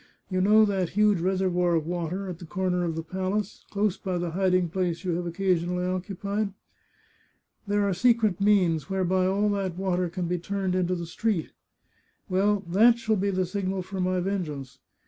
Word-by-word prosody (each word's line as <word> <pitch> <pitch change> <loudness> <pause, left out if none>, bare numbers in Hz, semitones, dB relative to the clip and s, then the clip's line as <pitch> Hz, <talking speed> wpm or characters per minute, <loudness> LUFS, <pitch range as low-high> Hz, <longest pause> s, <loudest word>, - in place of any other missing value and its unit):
" - - -44
You 185 0 +1
know 215 +3 +6
that 190 -4 0
huge 210 -3 +4
reservoir 180 -1 +1
of 160 -2 0
water, 175 +3 -3
at 175 -2 -6
the 175 - -9
corner 180 +2 -1
of 165 -2 -2
the 165 - -3
palace, 190 +4 -3
close 205 -1 0
by 185 -3 -2
the 175 -1 -2
hiding 185 0 +2
place 175 0 -2
you 185 - -1
have 175 +1 -2
occasionally 180 0 0
occupied? 200 +2 -2 1.1
There 205 0 +1
are 195 - +1
secret 220 -2 +2
means 185 -6 +3
whereby 185 -1 +1
all 200 +2 +1
that 195 -4 -2
water 185 -2 0
can 180 +1 -3
be 180 +1 -1
turned 195 +1 -2
into 185 0 +1
the 170 -1 -4
street. 185 0 -2 0.8
Well, 200 +2 +2
that 220 +7 +5
shall 220 -2 0
be 200 0 0
the 185 -1 0
signal 190 0 -2
for 190 +1 -6
my 185 0 +1
vengeance. 150 -9 -4
185 Hz, 185 wpm, -26 LUFS, 175-200 Hz, 1.1 s, know